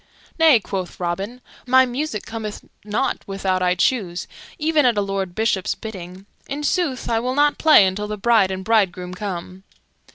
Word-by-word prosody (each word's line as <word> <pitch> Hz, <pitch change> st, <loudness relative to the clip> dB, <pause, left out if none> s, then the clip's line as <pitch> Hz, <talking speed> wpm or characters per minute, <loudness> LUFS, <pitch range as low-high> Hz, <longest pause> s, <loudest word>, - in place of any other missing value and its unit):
"Nay," 315 Hz, -7 st, +6 dB
quoth 190 Hz, -3 st, -5 dB
Robin, 195 Hz, +8 st, -3 dB, 0.3 s
"my 260 Hz, +1 st, +6 dB
music 250 Hz, -3 st, -4 dB
cometh 220 Hz, -2 st, -6 dB, 0.2 s
not 210 Hz, +6 st, -1 dB
without 190 Hz, -1 st, -1 dB
I 180 Hz, 0 st, +2 dB
choose, 180 Hz, -3 st, 0 dB, 0.3 s
even 310 Hz, 0 st, +2 dB
at 240 Hz, -4 st, +3 dB
a -, -, +3 dB
lord 195 Hz, -2 st, -3 dB
bishop's 210 Hz, -4 st, 0 dB
bidding. 190 Hz, -3 st, -9 dB, 0.2 s
In 285 Hz, +2 st, -4 dB
sooth, 295 Hz, -5 st, -1 dB
I 230 Hz, -1 st, +1 dB
will 250 Hz, +2 st, -2 dB
not 290 Hz, +1 st, +3 dB
play 310 Hz, -10 st, +7 dB
until 195 Hz, +3 st, -2 dB
the 210 Hz, 0 st, -4 dB
bride 215 Hz, -2 st, +3 dB
and 190 Hz, 0 st, -4 dB
bridegroom 190 Hz, -5 st, +1 dB
come." 185 Hz, -1 st, -6 dB
210 Hz, 165 wpm, -21 LUFS, 190-250 Hz, 0.3 s, play